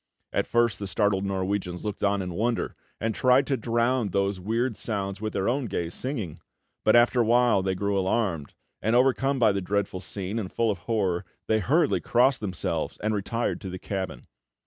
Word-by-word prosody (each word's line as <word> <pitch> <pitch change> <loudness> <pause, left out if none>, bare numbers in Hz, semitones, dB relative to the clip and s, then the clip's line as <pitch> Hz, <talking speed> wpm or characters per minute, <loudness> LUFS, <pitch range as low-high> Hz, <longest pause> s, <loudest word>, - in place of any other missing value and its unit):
At - - 0
first 120 -5 +2
the 100 - -4
startled 100 -1 +1
Norwegians 95 -1 -2
looked 105 -1 -4
on 100 -1 +2
in 90 -1 -5
wonder, 115 +5 -1 0.2
and 110 +1 -1
tried 130 0 +4
to 140 - +1
drown 120 -1 +1
these 100 +1 0
weird 115 +5 -1
sounds 100 -2 -3
with 110 0 -3
their 95 - 0
own 130 +2 +1
gay 85 -5 -3
singing; 110 - -4 0.4
but 110 - +5
after 120 +1 +5
a - - +4
while 120 -2 +4
they 95 0 -1
grew 100 +1 0
alarmed, 95 -6 -1 0.3
and, 110 +3 +1
overcome 135 +2 +3
by 115 -4 +5
the 100 0 -1
dreadful 100 0 -1
scene, 100 +3 -4
and 95 -4 -5
full 115 -2 +1
of 100 - -4
horror, 95 -5 +1 0.2
they 110 - +2
hurriedly 150 - +2
crossed 125 +2 +3
themselves 95 -5 -3
and 110 0 +1
retired 110 +3 -2
to 95 - -5
the 90 - -5
cabin. 95 0 -5
105 Hz, 190 wpm, -26 LUFS, 95-120 Hz, 0.4 s, but